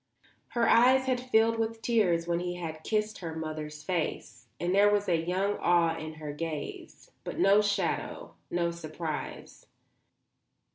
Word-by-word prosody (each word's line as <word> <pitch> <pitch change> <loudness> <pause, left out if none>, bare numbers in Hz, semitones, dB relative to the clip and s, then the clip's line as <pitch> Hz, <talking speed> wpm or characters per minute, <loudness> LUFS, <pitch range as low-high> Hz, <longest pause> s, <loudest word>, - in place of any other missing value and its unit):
Her 230 - +3
eyes 260 +2 +5
had 255 -1 0
filled 230 -2 +2
with 225 0 -2
tears 180 -8 +2
when 170 0 +1
he 175 0 -3
had 160 -3 -6
kissed 215 -1 -1
her 165 -3 -5
mother's 155 -1 -5
face, 170 -1 -3
and 175 +1 0
there 200 +1 +6
was 205 0 +1
young 180 +4 0
awe 170 -2 +3
in 155 -1 -7
her 150 -1 -6
gaze; 155 0 -6
but - - -6
no 200 +2 +5
shadow, 200 -4 -2 0.2
no 170 -1 0
surprise. 160 -1 -6
175 Hz, 145 wpm, -29 LUFS, 160-210 Hz, 0.2 s, there